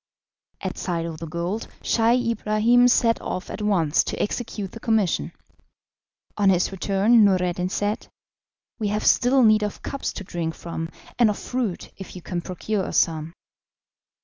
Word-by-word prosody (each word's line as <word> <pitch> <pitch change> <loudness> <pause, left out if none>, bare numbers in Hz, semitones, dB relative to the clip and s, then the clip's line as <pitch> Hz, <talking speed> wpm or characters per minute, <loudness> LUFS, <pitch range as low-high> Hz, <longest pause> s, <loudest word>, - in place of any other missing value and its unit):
At - - -4
sight 170 -2 -2
of 160 -2 -6
the 165 - -6
gold, 170 +7 -3 0.2
Scheih 235 +1 +2
Ibrahim 230 +3 +3
set 230 -2 +3
off 185 - -5
at - - -6
once 175 -7 +2
to - - -4
execute 210 -3 -3
the 230 - -9
commission. 220 -6 +1 1.1
On 200 -2 +4
his 180 0 +2
return, 200 +4 +3
Noureddin 180 -2 +2
said: 205 +2 -2 0.7
"We 215 - 0
have 210 +1 -1
still 255 +1 +4
need 215 -1 +5
of 210 -1 -4
cups 275 - -3
to - - -6
drink 170 -3 -4
from, 165 -1 -5 0.3
and 235 -3 +6
of 210 - -1
fruit, 245 -8 -3
if 190 - -9
you 180 - -9
can 175 -2 -3
procure 190 +3 -3
us - - -2
some." 160 0 +1
200 Hz, 160 wpm, -24 LUFS, 175-225 Hz, 1.1 s, and